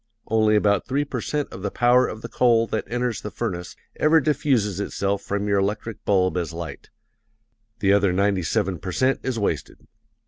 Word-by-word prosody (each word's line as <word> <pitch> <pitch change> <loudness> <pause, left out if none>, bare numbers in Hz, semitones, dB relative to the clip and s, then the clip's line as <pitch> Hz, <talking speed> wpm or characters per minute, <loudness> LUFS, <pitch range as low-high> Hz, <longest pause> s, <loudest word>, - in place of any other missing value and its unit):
Only 110 -1 +3
about 100 -2 +2
three 140 +3 0
per 125 -4 -4
cent 145 +3 -3
of 95 - -8
the 100 - -2
power 125 +4 +3
of 110 - -7
the - - -4
coal 115 -2 +3
that 110 -1 -3
enters 120 -1 -2
the 105 - -5
furnace 90 -5 -4 0.2
ever 155 +2 +5
diffuses 130 - +1
itself 100 -1 -1
from 100 +1 -2
your 100 -1 +2
electric 105 +3 -3
bulb 95 -2 +2
as 85 -3 -2
light 85 -1 -7 0.9
the 100 -1 +4
other 100 -2 +3
ninety 100 +1 +1
seven 95 0 -1
per 95 +3 -5
cent 130 +6 +2
is 130 -3 -2
wasted. 105 - -3
105 Hz, 185 wpm, -23 LUFS, 100-120 Hz, 0.9 s, ever